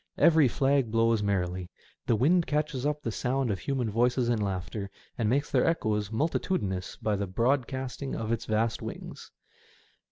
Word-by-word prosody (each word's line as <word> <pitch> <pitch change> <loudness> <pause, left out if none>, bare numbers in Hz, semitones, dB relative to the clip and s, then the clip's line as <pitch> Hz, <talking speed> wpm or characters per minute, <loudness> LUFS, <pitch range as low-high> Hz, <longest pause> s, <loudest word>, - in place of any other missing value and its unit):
Every 160 -4 +6
flag 135 0 +2
blows 115 0 +2
merrily; 90 -3 -1 0.4
the 115 - +4
wind 165 - +3
catches 150 -2 -1
up 150 0 -2
the 115 - -2
sound 125 +1 0
of 95 - -2
human 135 -4 -1
voices 120 +2 +2
and 115 -3 +1
laughter, 100 0 -3 0.3
and 115 -5 0
makes 140 +5 +1
their - - +3
echoes 105 -10 0
multitudinous 110 - -1
by 105 -1 -1
the 100 0 -2
broad 120 +7 +1
casting 130 0 -4
of 110 0 -3
its 115 - -1
vast 110 +1 0
wings. - - -8
115 Hz, 165 wpm, -28 LUFS, 105-135 Hz, 0.4 s, Every